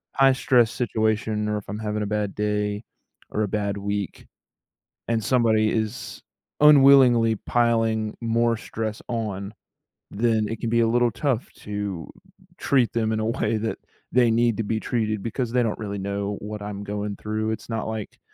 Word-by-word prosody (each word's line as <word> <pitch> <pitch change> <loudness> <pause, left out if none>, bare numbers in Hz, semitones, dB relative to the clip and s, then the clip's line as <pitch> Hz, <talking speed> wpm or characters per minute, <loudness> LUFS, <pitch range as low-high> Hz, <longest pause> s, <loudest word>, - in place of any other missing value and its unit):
high-stress 130 -4 +4
situation, 110 -2 0
or 105 - 0
if 105 - -7
I'm 105 +2 -4
having 105 -1 -2
a - - -2
bad 105 -1 -2
day, 105 0 -1 0.5
or 110 - 0
a - - 0
bad 100 0 -2
week, 100 -1 -4 0.8
and 115 -2 0
somebody 110 -4 +3
is 110 -1 -3 0.4
unwillingly 135 -6 +7
piling 115 -1 +1
more 115 0 +1
stress 110 -1 -5
on, 105 -4 -3 0.6
then 110 0 +1
it 115 - -4
can 115 - -2
be 115 +1 +2
a 115 - +3
little 120 +1 +2
tough 130 +1 -1
to 100 -5 -5 0.5
treat 130 -4 +2
them 110 -1 0
in 110 - 0
a 110 - -1
way 110 -1 0
that 110 +1 -2 0.3
they 120 -1 +4
need 115 -1 +2
to 115 - -1
be 110 +1 -1
treated 110 -4 -1
because 115 +1 -2
they 125 -1 +2
don't 110 - -1
really 100 -2 -4
know 100 +1 -3
what 105 0 -6
I'm 100 -1 -5
going 105 0 -4
through. 110 0 -3
It's 110 - -5
not 110 -2 -2
like 110 -2 -6
110 Hz, 170 wpm, -24 LUFS, 105-115 Hz, 0.8 s, unwillingly